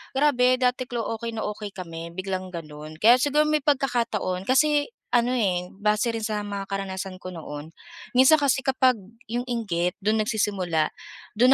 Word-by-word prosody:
“Grabe 255 -3 +4
dati 255 0 0
clo 240 -3 -3
okay 230 0 -4
na 220 - -3
okay 210 -1 -5
kami 170 -2 -7
biglang 185 0 -3
gano'n.” 155 -3 -8
Kaya 240 +3 +7
siguro 295 +3 +3
may 305 0 +2
pagkakataon, 240 -9 0
kasi 290 +3 +3 0.2
ano 245 0 +2
eh, 185 -7 0
base 210 +3 +1
rin 230 - -3
sa 210 -1 -2
mga 200 -1 -5
karanasan 195 -1 -4
ko 185 0 -8
noon. 155 -2 -8 0.4
Minsan 260 +5 +7
kasi 280 -2 +2
kapag 260 -2 +3 0.4
'yong 245 +2 -2
inggit 180 -8 -1
do'n 215 +1 +2
nagsisimula, 195 -7 0 0.4
do'n 240 +4 +4
215 Hz, 160 wpm, -25 LUFS, 185-255 Hz, 0.4 s, Kaya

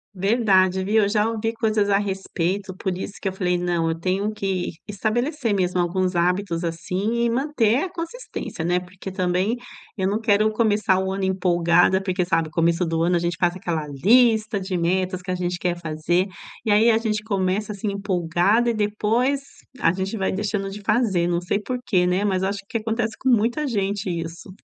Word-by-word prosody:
Verdade, 190 -2 +3
viu? 215 +2 +3
Eu 200 - +1
já 215 +1 +2
ouvi 225 0 -2
coisas 215 -2 +1
a 200 0 +3
respeito, 190 -1 -2
por 185 -1 -3
isso 195 - -5
que 195 - 0
eu - - -7
falei: 180 -2 0
“Não! 175 -2 0
Eu 165 0 -2
tenho 195 +4 -1
que 190 -3 -2 0.2
estabelecer 230 +4 -1
mesmo 180 -2 0
alguns 180 +1 0
hábitos, 180 0 0
assim, 185 +8 -1
e - - +2
manter 255 - +1
a 375 - -3
consistência, 335 - -6
né?” 180 +1 +2
Porque 185 +1 -9
também 185 +4 0 0.4
eu 190 -2 0
não 210 +3 0
quero 215 -1 +3
começar 210 -4 +2
o 190 0 -1
ano 195 0 -3
empolgada, 175 0 +3
porque, 185 -2 -1
sabe, 165 -2 0
começo 170 +2 +1
do 165 0 0
ano 175 +1 +2
a - - 0
gente 170 -1 -2
faz 175 0 +2
aquela 170 -5 -3
lista 215 - +3
de 190 -1 -4
metas 185 +2 0
que 185 - -11
a 180 - 0
gente 180 -1 -2
quer 175 -1 -1
fazer, 165 +3 0 0.4
e 215 - +2
aí 220 +3 +5
a 220 - +4
gente 215 -2 -1
começa, 200 0 -1
assim, 205 +1 -3
empolgada 200 +4 +1
e - - -2
depois 220 +6 +1 0.4
a 165 - +3
gente 195 +4 -3
vai 190 - 0
deixando 195 0 -2
de 205 +1 -8
fazer, 200 -6 +1
não 170 0 +1
sei 180 +3 -1
por 250 +4 -3
quê, 180 -3 +2
né? 185 +3 +1
Mas 190 -2 +1
acho 200 +1 -1
que 230 - -2
acontece 225 0 -2
com 260 - 0
muita 240 +6 +2
gente 200 -4 -1
isso. 165 +1 -5
195 Hz, 195 wpm, -23 LUFS, 180-215 Hz, 0.4 s, aí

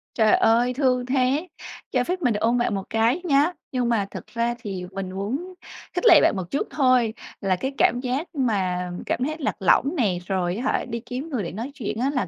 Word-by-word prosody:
Trời 220 -2 +5
ơi, 240 +2 +3
thương 250 -2 +1
thế, 265 +5 +1 0.4
cho 250 -2 +2
phép 360 +6 -3
mình 250 -6 +2
được 210 - -2
ôm 235 +2 +2
bạn 240 -3 0
một 195 - -3
cái 230 +9 +2
nhá! 300 +1 +3 0.2
Nhưng 250 -2 0
mà 220 -4 +1
thật - - -7
ra 235 0 0
thì 190 -3 -5
mình 195 -1 -5
muốn 255 - -4 0.4
khích - - -2
lệ - - +9
bạn - - +4
một 185 -2 -5
chút 280 - -1
thôi, 255 -5 +3 0.3
là 195 -2 +1
cái 265 +9 -3
cảm 245 - +3
giác 260 +6 -2
mà 185 -9 0
cảm 250 - -1
thấy 305 +4 -1
lạc 290 - -1
lõng 270 - +3
nè, 205 - +1
rồi 185 -2 0
á 235 - -4
hả, - - -1
đi 235 -2 -4
kiếm 255 +6 -5
người 245 -9 -2
để 170 - -5
nói 230 +9 -5
chuyện 220 -5 -4
á 265 - +1
là 260 - 0
245 Hz, 230 wpm, -24 LUFS, 205-270 Hz, 0.4 s, lệ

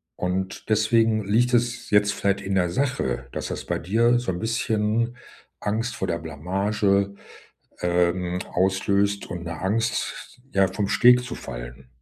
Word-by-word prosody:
Und 95 +3 -3
deswegen 110 0 +3
liegt 120 +4 +2
es 120 0 0
jetzt 105 0 +4
vielleicht 100 0 0
in 100 0 -2
der 90 -2 +2
Sache, 85 - -1
dass - - -3
das - - -5
bei - - -1
dir 115 +7 +3
so 120 -6 -2
'n 90 - -4
bisschen 115 +1 0 0.4
Angst 115 +4 -2
vor 95 - -2
der 85 -1 -1
Blamage, 100 +5 0 0.7
ähm, 90 +1 +1
auslöst 100 +2 +1
und 85 -1 -5
'ne 85 - -5
Angst, 115 +6 -2
ja, 95 -1 +4
vom 100 +1 -1
Steg 125 +2 +5
zu 125 - -6
fallen. - - -8
100 Hz, 150 wpm, -24 LUFS, 90-115 Hz, 0.7 s, Steg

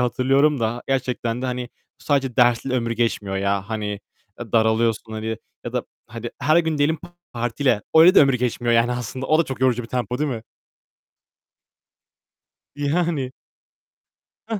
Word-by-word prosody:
hatırlıyorum 135 +4 +2
da 115 +2 -1
gerçekten 125 -2 -1
de, - - -1
hani, 125 -1 -3 0.3
bu - - -17
sadece 135 -4 0
dersle 120 +1 +3
ömür 120 -2 -1
geçmiyor 115 -4 -1
ya. 100 0 -1
Hani, 105 -2 -3 0.4
e, 115 -3 -8
daralıyorsun, 110 0 +1
hani 110 +1 -3 0.3
ya - - -5
da - - -1 0.2
hadi 115 +1 -7
her 155 +3 +3
gün 160 -3 0
diyelim 155 +3 +2 0.3
partile. 120 -1 0
Öyle 165 +4 +8
de - - +8
ömür 135 -2 +4
geçmiyor, 120 -1 0
yani 115 +1 +3
aslında 125 +2 -5
o 155 - +3
da - - +5
çok 130 -3 -6
yorucu 125 -2 +2
bir 115 - -10
tempo, 125 -1 -2
değil 150 0 0
mi? 115 -3 -4 2.3
Yani. 145 -2 -1 1.2
Heh. 220 -2 -2
125 Hz, 155 wpm, -22 LUFS, 115-135 Hz, 2.3 s, Öyle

